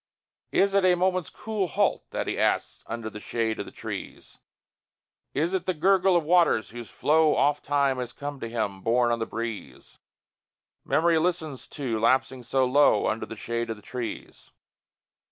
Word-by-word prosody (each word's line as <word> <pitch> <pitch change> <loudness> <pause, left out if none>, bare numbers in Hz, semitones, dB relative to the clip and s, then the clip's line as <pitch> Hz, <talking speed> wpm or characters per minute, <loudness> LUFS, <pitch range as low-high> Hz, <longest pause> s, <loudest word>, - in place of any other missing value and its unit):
Is 195 0 +3
it 200 -1 +3
a 180 -1 +5
moment's 185 -1 0
cool 215 -4 -3
halt - - 0
that - - -3
he - - -2
asks - - 0
Under 115 -1 -5
the 105 -1 -7
shade 115 0 -2
of - - -4
the - - -9
trees? - - -8 1.0
Is 165 +5 0
it 190 - -2
the 185 - 0
gurgle 190 +3 +3
of 170 - +3
waters 170 -8 +3
whose 120 -1 -8
flow 155 0 +3
Ofttime 140 -2 +1
has 125 -1 -4
come 145 +1 -6
to 115 - -5
him, 105 -4 -3
borne 120 +3 +2
on 115 - 0
the 115 - -2
breeze, 115 -2 -7 0.8
Memory 165 0 +3
listens 160 -7 -2
to, 125 -7 -3
lapsing 130 +2 +2
so 130 +2 +1
low, 140 +3 +4
Under - - -1
the - - -7
shade 115 0 -3
of 115 - -2
the 105 - -17
trees? 125 -2 -7
140 Hz, 170 wpm, -26 LUFS, 115-170 Hz, 1.0 s, a